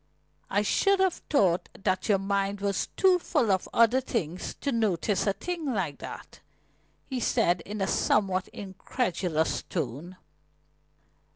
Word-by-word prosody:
"I 205 +1 +2
should 395 - +3
have 380 -2 +1
thought 185 - +2
that 185 0 0
your 200 - +5
mind 200 +1 -1
was 200 -1 -1
too 370 -2 +5
full 285 - +1
of 190 -1 0
other 235 +3 +4
things 185 -9 -3
to 280 - 0
notice 210 -4 +1
a 200 - +3
thing 330 - -3
like 165 -8 -2
that," - - -9 0.7
he 260 -2 -3
said 175 -6 +2
in 210 0 -5
a 195 - +1
somewhat 190 -2 +1
incredulous 185 -4 -2
tone. 160 +3 -5
200 Hz, 135 wpm, -28 LUFS, 185-245 Hz, 0.7 s, your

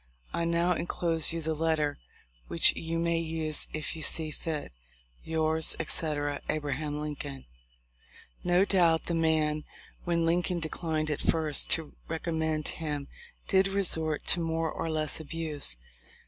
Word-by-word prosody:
I 170 - 0
now 170 +1 +2
enclose 165 -2 0
you 165 0 -3
the 160 +1 0
let 160 +1 +2
ter, 150 -1 -1 0.5
which 85 - +5
you 165 0 -3
may 170 0 +1
use 160 -2 -1
if 155 +1 -3
you 160 - -6
see 155 +1 +3
fit. 155 0 -4 0.5
"Yours, 160 0 +1
etc. 145 -3 -1
"A. - - +2
Lincoln/' 145 -1 -4 1.0
No 180 +2 +4
doubt 170 -5 +3
the 170 - -2
man, 155 -2 +2 0.4
when 170 -1 +1
Lincoln 175 +1 +1
declined 155 -1 -2
at 145 - -2
first 155 -3 +4
to 160 -2 -3
recommend 160 -1 -1
him, 150 -3 -4 0.4
did 190 0 +4
resort 165 -6 0
to - - +6
more 165 -1 0
or 165 - -3
less 155 -1 -1
abuse. 155 - -3
160 Hz, 140 wpm, -29 LUFS, 155-165 Hz, 1.0 s, to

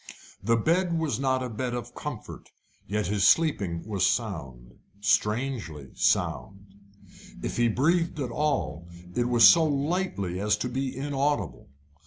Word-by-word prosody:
The 115 +4 +2
bed 170 - +1
was 150 -8 -1
not 130 -1 +1
a 125 - -4
bed 120 +2 -3
of 120 - -6
comfort, - - -8 0.4
yet 105 0 -1
his 100 +1 +2
sleep 160 -4 +4 0.2
was 100 -4 -2
sound - - -2 0.2
strangely 105 - -1
sound. 100 0 -1 0.7
If - - -3
he 120 0 +3
breathed 160 +8 +1
at 125 -4 -3
all, 120 - -1 0.3
it 120 +3 0
was 120 -2 +7
so 165 - +7
lightly 145 - -1
as 105 +1 +1
to 125 +4 -3
be 130 +1 -3
inaudible. 140 - -2
120 Hz, 140 wpm, -27 LUFS, 100-145 Hz, 0.7 s, was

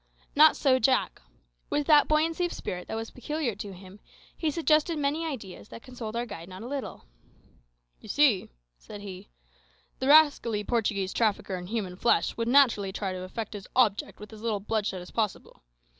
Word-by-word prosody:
Not 310 +2 +7
so, 260 -3 +3
Jack. 255 +2 +1 0.5
With 295 - 0
that 300 -1 +6
buoyancy 320 +3 +1
of - - -8
spirit 180 0 -6
that - - -4
was 225 0 -5
peculiar 290 -1 -3
to 205 -1 -6
him, 190 +2 -13 0.4
he 320 - -1
suggested 310 +1 +2
many 300 +3 -1
ideas 215 - -7
that 230 - -11
consoled 240 -4 -7
our 240 +1 -1
guide 175 -6 -9
not 185 +3 -9
a - - -6
little. 275 - -6 0.9
"You 215 - -14
see," 265 -6 +3 0.3
said 205 - -10
he, 190 -3 -9 0.7
"the 260 - -1
rascally 285 -8 +5
Portuguese 205 -4 -1
trafficker 210 -4 0
in 180 -1 -7
human 195 -4 -3
flesh 235 - +2
would 230 0 -2
naturally 235 -7 +4
try 190 -1 -3
to 185 - -6
effect 215 +4 -6
his 200 -2 -8
object 215 -6 +2
with 210 +1 -11
as 215 - -11
little 220 -3 -1
bloodshed 200 -3 -2
as 180 - -13
possible. 215 -4 -3
225 Hz, 180 wpm, -28 LUFS, 200-280 Hz, 0.9 s, Not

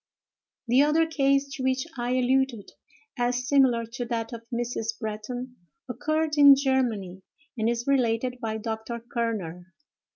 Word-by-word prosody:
The 250 +3 +5
other 305 +3 +3
case 275 -3 +1
to 265 - -5
which 260 0 0
I 245 0 -2
alluded, 255 -3 +1 0.5
as 245 +1 0
similar 260 -5 +3
to 240 +2 -6
that 230 -1 -3
of 230 - -6
Mrs. 235 -2 -3
Bretton, 245 +4 -5 0.3
occurred 310 +3 -1
in 285 -1 +10
Germany, 240 -9 -1 0.3
and 225 -1 0
is 235 0 -2
related 250 -2 +1
by 220 -2 -2
Dr. 220 +1 -5
Kerner. 210 -7 -4
245 Hz, 135 wpm, -26 LUFS, 225-265 Hz, 0.5 s, in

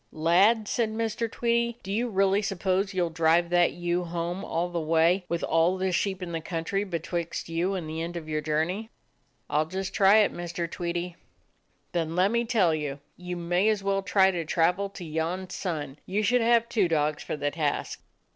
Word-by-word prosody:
"Lad," 195 +8 +3
said 230 0 0
Mr. 225 +1 -2
Tweedie, 235 0 0
"do 195 - -4
you 240 +3 0
really 195 0 +2
suppose 195 0 0
you 185 -2 +1
'll 165 - -5
drive 165 +1 +2
that 175 -1 +4
ewe 175 0 -1
home 175 +2 -3
all 170 -1 -1
the 175 -1 -3
way, 165 +4 +2
with 170 0 -2
all 165 +3 +2
the 190 0 0
sheep 190 +1 -1
in 175 - -5
the 165 -1 -3
country 165 +4 -2
betwixt 170 -2 -4
you 175 +4 0
and 175 -4 -4
the 160 +1 -4
end 170 +1 -4
of 160 -2 -7
your 155 -1 -1
journey?" 160 +8 -1 0.6
"I 150 - +1
'll 155 - -2
just 190 +2 -4
try 200 +1 +6
it, 210 - +1
Mr. 175 0 -4
Tweedie." 175 +1 -4 0.7
"Then 165 -1 -2
let 185 +3 +3
me 235 0 +1
tell 210 -8 +3
you: 145 -2 -3 0.2
you 180 0 -6
may 175 +4 +1
as 210 -2 0
well 195 0 +1
try 190 0 +4
to 175 -2 -2
travel 175 +5 +1
to 185 -2 -9
yon 165 +4 -3
sun. 150 -8 -4
You 205 +3 0
should 245 +4 +3
have 235 0 +3
two 215 -6 +2
dogs 150 -2 0
for - - -4
the 145 0 -1
task." 150 -3 -2
175 Hz, 205 wpm, -27 LUFS, 165-195 Hz, 0.7 s, try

